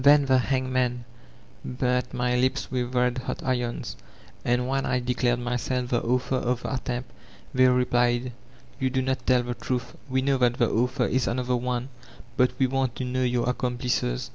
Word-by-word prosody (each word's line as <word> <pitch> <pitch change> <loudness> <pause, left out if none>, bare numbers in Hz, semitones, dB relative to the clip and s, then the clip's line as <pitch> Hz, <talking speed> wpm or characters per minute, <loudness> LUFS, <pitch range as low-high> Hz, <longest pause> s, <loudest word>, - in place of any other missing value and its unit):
Then 145 0 +7
the 130 -1 +4
hangmen 130 -2 0 0.6
burnt 125 0 -1
my 125 0 0
lips 130 +2 0
with 125 -1 -2
red 125 0 +2
hot 125 - -5
irons, 125 -2 -2 0.5
and 125 +1 +1
when 135 +1 0
I 130 - +1
declared 125 0 +1
myself 125 +1 -2
the 120 - +2
author 125 +2 0
of 125 -1 -1
the - - -3
attempt 125 -1 -3 0.4
they 130 0 +5
replied, 125 0 +2 0.5
'You 130 -1 +1
do 130 0 0
not 130 0 -2
tell 125 -1 +4
the 120 0 -3
truth. 125 0 -3 0.2
We 130 0 +1
know 135 -1 +2
that 120 -1 +3
the 120 -2 +2
author 125 +2 +1
is 130 +1 +1
another 125 +1 0
one, 125 +1 -2 0.5
but 125 0 +4
we 130 - +3
want 130 -1 0
to 130 - -3
know 130 +1 -1
your 125 -1 +1
accomplices. 125 - -1
125 Hz, 180 wpm, -26 LUFS, 125-130 Hz, 0.6 s, Then